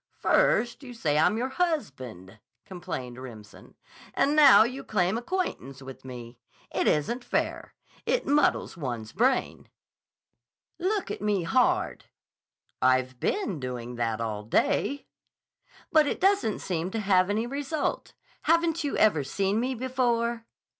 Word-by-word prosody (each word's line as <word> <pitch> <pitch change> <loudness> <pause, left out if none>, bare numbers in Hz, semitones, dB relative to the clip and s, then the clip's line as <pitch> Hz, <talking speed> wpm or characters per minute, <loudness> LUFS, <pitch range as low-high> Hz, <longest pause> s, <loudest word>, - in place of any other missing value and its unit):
"First - - +2
you 250 -3 -10
say 150 -9 +1
I'm 210 +7 +3
your 250 +3 -1
husband," 130 - -3 0.3
complained 130 -9 -6
Remsen, 110 -5 -12 0.4
"and 290 +2 +2
now 280 -9 +8
you 255 +4 -4
claim 190 -1 0
acquaintance 235 - -3
with 135 0 -10
me. 120 -2 -9 0.3
It - - 0
isn't 235 - +1
fair. - - -2 0.3
It - - +1
muddles 290 +1 +2
one's 120 -8 -5
brain." 255 +3 0 1.1
"Look 390 +2 -1
at - - -5
me 205 -3 0
hard." 165 - +1 0.8
"I've 130 0 +2
been 380 - -1
doing 125 -2 -5
that 115 -2 -1
all 110 -2 -3
day." 280 - 0 0.9
"But 310 -2 +5
it - - -2
doesn't 390 - +2
seem 175 -1 -2
to 225 - -3
have 190 -2 +3
any 215 +3 0
result 285 +4 -3 0.3
Haven't 335 0 +2
you 285 - -2
ever 180 -9 +3
seen 195 +9 0
me 255 +2 -1
before?" 235 -2 -1
210 Hz, 135 wpm, -27 LUFS, -, 1.1 s, now